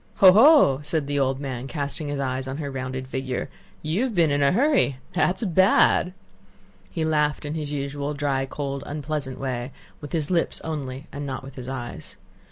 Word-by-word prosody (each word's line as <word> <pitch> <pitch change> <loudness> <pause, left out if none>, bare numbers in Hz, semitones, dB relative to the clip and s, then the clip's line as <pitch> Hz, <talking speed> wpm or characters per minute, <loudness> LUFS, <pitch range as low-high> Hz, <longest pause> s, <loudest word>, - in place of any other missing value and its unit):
"Ho, 190 -2 +8
ho!" 225 - +7
said 150 0 -1
the 145 0 -1
old 135 -1 +1
man, 130 -2 -5
casting 145 +1 -3
his 145 -1 -3
eyes 130 -1 -2
on 135 +1 -4
her 145 -3 -4
rounded 130 0 -4
figure. 130 -1 -3 0.3
"You've 205 +10 -1
been 165 -4 +4
in 145 0 +1
a 140 - +4
hurry. 255 - +2 0.2
That's 185 +6 +1
bad!" 185 -1 +4 0.8
He 160 +11 -2
laughed 150 -1 +1
in 145 - -3
his 150 -2 -4
usual 140 +1 -3
dry, 140 -2 -1
cold, 140 0 -4
unpleasant 145 -2 -4
way, 130 -1 -3 0.3
with 145 - -9
his 155 0 -1
lips 170 -2 +1
only 140 -3 -5
and 145 0 -5
not 130 0 -5
with 135 0 -10
his 130 -1 -8
eyes. 120 -10 -7
145 Hz, 180 wpm, -24 LUFS, 135-155 Hz, 0.8 s, Ho